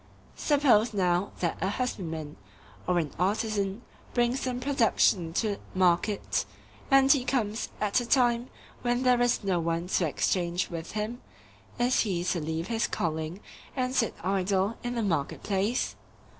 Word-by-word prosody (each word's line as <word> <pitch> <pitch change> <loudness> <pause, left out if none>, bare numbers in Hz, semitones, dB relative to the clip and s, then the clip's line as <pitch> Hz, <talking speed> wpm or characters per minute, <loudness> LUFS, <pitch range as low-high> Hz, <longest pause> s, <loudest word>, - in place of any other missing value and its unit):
Suppose 245 -7 +3
now 180 0 +1
that 170 -2 -1
a 190 - +1
husbandman, 165 - -3 0.5
or 180 - +2
an 155 -5 0
artisan, 205 +2 0 0.3
brings 240 +1 +2
some 255 -2 -2
production 225 -10 +2
to 205 +1 0 0.2
market, 185 +3 +2 0.5
and 270 -1 +6
he 275 -3 +4
comes 230 -4 -1
at 210 +2 +2
a - - -4
time 240 -1 +3 0.3
when 245 +1 0
there 250 -1 +4
is 245 -2 +2
no 190 -3 +1
one 165 +1 -1
to 180 -3 +2
exchange 175 +4 0
with 165 -1 -6
him,—is 240 +2 -3
he 185 -6 0
to 180 -1 0
leave 160 +2 -2
his 225 +3 0
calling 160 +3 -3 0.3
and 255 -1 -1
sit 230 -4 +1
idle 195 +2 +1
in 245 0 -3
the 230 - 0
market 165 -8 -1
place? 205 +5 0
205 Hz, 145 wpm, -28 LUFS, 175-245 Hz, 0.5 s, and